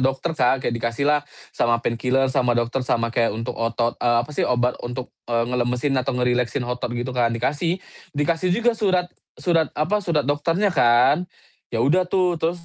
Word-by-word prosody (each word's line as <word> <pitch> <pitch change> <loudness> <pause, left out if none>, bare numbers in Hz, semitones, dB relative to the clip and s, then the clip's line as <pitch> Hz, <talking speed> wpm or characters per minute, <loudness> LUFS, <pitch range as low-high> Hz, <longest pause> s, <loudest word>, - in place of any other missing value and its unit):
dokter, 135 +6 0
Kak, 130 -3 +1
kayak - - 0
dikasih 115 +3 -2
lah 150 0 +3 0.3
sama 120 0 +2
pain 115 0 -1
killer 130 +1 +1
sama 125 -2 +2
dokter 120 +3 0
sama 115 -2 0
kayak 120 -1 +2
untuk 115 +2 -4
otot 115 +1 -1
eee, 120 -1 +3
apa 145 - -12
sih, - - -2
obat 125 0 +2
untuk, 125 +1 -6 0.2
eee, 115 -1 +1
ngelemesin 125 +3 0
atau 125 0 -2
ngerileksin 125 +1 0
otot 125 0 -3
gitu 125 +2 -3
kan, 120 -2 +2
dikasih, 145 +9 -1 0.4
dikasih 165 +5 +1
juga 235 +1 +2
surat 190 -5 +1 0.3
surat, 165 -4 +1
apa, 165 +8 +1
surat 170 -6 0
dokternya 165 +8 +1
kan. 135 +5 +4 0.4
Ya 115 0 0
udah 180 +6 +2
tuh, 180 -3 +1
terus, 170 +1 -2
130 Hz, 185 wpm, -22 LUFS, 120-165 Hz, 0.4 s, kan